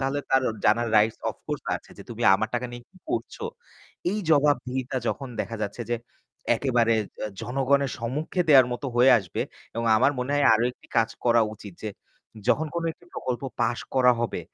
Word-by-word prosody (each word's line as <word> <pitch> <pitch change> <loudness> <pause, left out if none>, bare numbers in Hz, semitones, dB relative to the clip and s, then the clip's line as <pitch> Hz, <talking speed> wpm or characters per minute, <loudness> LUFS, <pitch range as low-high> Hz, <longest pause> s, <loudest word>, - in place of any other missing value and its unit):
তাহলে 135 +1 0
তার 130 0 +4 0.2
জানার 115 +2 +3
রাইটস 110 +1 +3
অফকোর্স - - -6
আছে - - -17
যে, - - -8
"তুমি 120 +1 -5
আমার 110 +3 0
টাকা 125 +1 -1
নিয়ে 120 0 -8
কি 190 - -24
করছো।" 410 +6 -3 0.7
এই 210 - -1
জবাবদিহিতা 135 -3 +2
যখন 135 -2 -3
দেখা 115 - -4
যাচ্ছে 105 +4 -4
যে 120 - +2 0.6
একেবারে 120 -3 +2 0.2
অ্যা 110 - -3
জনগণের 135 +1 +1
সম্মুখে 145 +10 -2
দেওয়ার 130 -4 +8
মতো 135 +3 -4
হয়ে 125 +2 +6
আসবে 90 -4 -5 0.3
এবং 115 0 -2
আমার 140 +6 +4
মনে 125 +3 -2
হয় 145 -1 +3
আরও 115 - +2
একটি - - -23
কাজ 115 -1 +4 0.2
করা 120 -1 +5
উচিত 100 -3 -11
যে, 110 - -2 0.6
যখন 160 +2 +3
কোন 170 - -1
একটি 175 - -23
প্রকল্প 125 +1 -3 0.2
পাস 120 - +1 0.2
করা 125 -1 +6
হবে 120 - -2
125 Hz, 180 wpm, -26 LUFS, 115-140 Hz, 0.7 s, দেওয়ার